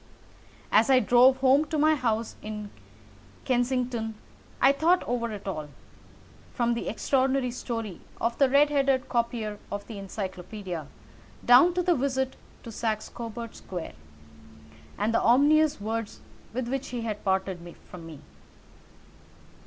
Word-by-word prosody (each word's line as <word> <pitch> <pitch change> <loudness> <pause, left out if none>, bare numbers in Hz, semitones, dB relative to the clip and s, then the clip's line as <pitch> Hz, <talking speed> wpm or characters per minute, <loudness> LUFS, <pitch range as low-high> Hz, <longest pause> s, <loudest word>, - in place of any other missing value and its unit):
As 220 +5 +4
I 260 -1 +6
drove 255 +1 +5
home 270 +3 +5
to 310 +1 -3
my 310 +1 +4
house 230 -5 -1
in 210 -1 -6 0.7
Kensington 245 -3 0 0.4
I 270 - +6
thought 330 +6 +2
over 235 -1 -2
it 205 -2 -8
all, 155 -6 -4 0.9
from 235 -1 +1
the 235 - -4
extraordinary 265 +2 +1
story 230 -6 -5 0.2
of 230 +1 0
the 275 -2 +5
red 290 +2 +4
headed 275 -2 +2
copier 235 -3 -1
of 205 0 -4
the 225 - -8
Encyclopædia 190 -3 -6 0.6
down 265 +9 +7
to 360 - +1
the 350 - +3
visit 265 -2 -1 0.3
to 230 - -8
Saxe 220 -1 -2
Coburg 230 0 -7
Square, 175 -3 -7 1.0
and 215 +2 0
the - - +3
ominous 295 +4 +4
words 220 +1 -4 0.3
with 240 +1 -3
which 270 +2 -3
he 245 -1 -4
had 215 -2 -4
parted 190 -1 0 0.3
from 170 -2 -10
me. 155 -4 -11
235 Hz, 135 wpm, -27 LUFS, 210-265 Hz, 1.0 s, down